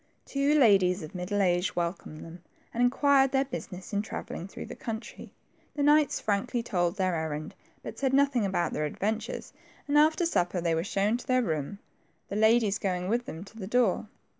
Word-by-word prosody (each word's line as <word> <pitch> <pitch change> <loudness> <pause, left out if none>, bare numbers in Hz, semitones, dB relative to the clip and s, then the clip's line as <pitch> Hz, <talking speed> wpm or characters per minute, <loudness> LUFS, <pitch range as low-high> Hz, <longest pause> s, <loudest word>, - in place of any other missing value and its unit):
Two 280 +2 +1
ladies 195 - +4
of 155 - -9
middle 195 +3 -1
age 180 0 +1
welcomed 170 -3 -4
them, 165 +1 -11 0.3
and 235 - -1
inquired 270 +2 +4
their 270 0 +2
business 190 -8 -7
in 205 - +1
travelling 195 -4 -6
through - - -8
the - - -8
country. 225 0 -7 0.4
The 290 - 0
knights 295 0 +4
frankly 230 +4 -1
told 175 -6 0
their 185 -2 +1
errand, 155 -1 -3 0.3
hut - - -7
said 265 -2 +1
nothing 275 -3 +3
about 190 -3 0
their 150 - -1
adventures, 215 +8 -3 0.3
and 295 +1 +4
after 315 +3 +3
supper 180 - 0
they 170 -1 0
were 165 0 0
shown 200 +4 0
to 245 - -12
their 255 -1 +3
room, 155 0 -3 0.5
the - - -4
ladies 220 -1 +3
going 180 -2 -2
with 240 +2 0
them 160 +3 -6
to 205 - -16
the 190 - -5
door. 225 -3 +1
205 Hz, 190 wpm, -28 LUFS, 180-250 Hz, 0.5 s, ladies